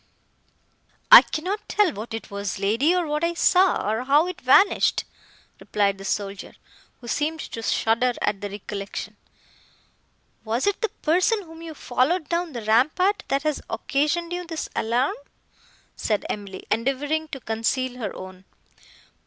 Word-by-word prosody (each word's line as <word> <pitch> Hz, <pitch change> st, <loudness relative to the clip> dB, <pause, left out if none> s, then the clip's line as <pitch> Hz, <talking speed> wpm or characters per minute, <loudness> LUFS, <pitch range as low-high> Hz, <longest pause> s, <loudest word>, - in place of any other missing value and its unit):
"I -, -, +13 dB
cannot 375 Hz, +7 st, -4 dB
tell 405 Hz, -7 st, +2 dB
what 220 Hz, +2 st, -6 dB
it 225 Hz, -, -8 dB
was, 200 Hz, 0 st, -4 dB
lady, 230 Hz, -, +2 dB
or 355 Hz, -1 st, +1 dB
what 300 Hz, +1 st, -2 dB
I 340 Hz, 0 st, 0 dB
saw, 365 Hz, -, +3 dB
or 220 Hz, +4 st, -1 dB
how 290 Hz, +4 st, +4 dB
it 365 Hz, 0 st, -6 dB
vanished," 275 Hz, +11 st, +4 dB, 0.6 s
replied 200 Hz, -2 st, 0 dB
the 195 Hz, -, -8 dB
soldier, 200 Hz, -1 st, -4 dB, 0.5 s
who 240 Hz, -, -11 dB
seemed 305 Hz, +6 st, -1 dB
to 225 Hz, -, -7 dB
shudder 230 Hz, +2 st, +1 dB
at 200 Hz, -1 st, -1 dB
the 205 Hz, -, -4 dB
recollection. 200 Hz, 0 st, -6 dB, 1.3 s
"Was 230 Hz, +3 st, -1 dB
it 405 Hz, -1 st, 0 dB
the 450 Hz, -, 0 dB
person, 370 Hz, +7 st, +1 dB
whom 325 Hz, -1 st, -13 dB
you 325 Hz, -2 st, -8 dB
followed 285 Hz, +6 st, 0 dB
down 340 Hz, -2 st, -1 dB
the 235 Hz, -3 st, -5 dB
rampart, 310 Hz, -, +2 dB
that 275 Hz, +1 st, 0 dB
has 305 Hz, -1 st, -1 dB
occasioned 330 Hz, +4 st, -1 dB
you 355 Hz, 0 st, -3 dB
this 330 Hz, -2 st, -5 dB
alarm?" 240 Hz, +5 st, +1 dB, 0.8 s
said 210 Hz, -2 st, -1 dB
Emily, 200 Hz, -2 st, -6 dB
endeavouring 275 Hz, +7 st, 0 dB
to 275 Hz, -, -7 dB
conceal 250 Hz, +3 st, -2 dB
her 210 Hz, -5 st, -4 dB
own. 185 Hz, 0 st, -10 dB
270 Hz, 150 wpm, -24 LUFS, 220-335 Hz, 1.3 s, I